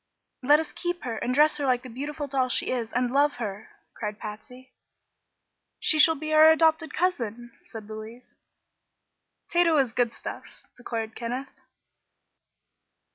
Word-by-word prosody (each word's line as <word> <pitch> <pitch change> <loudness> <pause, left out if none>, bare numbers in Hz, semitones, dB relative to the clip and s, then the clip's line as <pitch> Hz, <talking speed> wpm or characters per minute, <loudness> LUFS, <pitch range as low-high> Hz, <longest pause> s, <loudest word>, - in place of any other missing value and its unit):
"Let 290 +4 +5
us 320 - -5
keep 350 0 -4
her, 230 -3 -4
and 245 - -2
dress 300 +4 +4
her 285 -2 -2
like 250 -1 +1
the - - -8
beautiful 290 +5 -5
doll 265 -2 0
she - - +1
is, 235 -3 -3
and 245 0 0
love 285 +2 +3
her!" 210 -3 -6 0.2
cried 210 -2 -5
Patsy. 250 +5 -10 1.1
"She 310 - +1
shall 320 +2 +7
be 310 +1 -4
our 310 +1 +8
adopted 320 -1 +3
cousin," 240 - -2
said 220 -2 -9
Louise. 220 +3 -10 1.2
"Tato 340 -2 +3
is 260 -5 +1
good 240 -1 +1
stuff!" - - -9
declared 225 -2 -5
Kenneth. 250 +4 -5
255 Hz, 145 wpm, -26 LUFS, 230-305 Hz, 1.2 s, our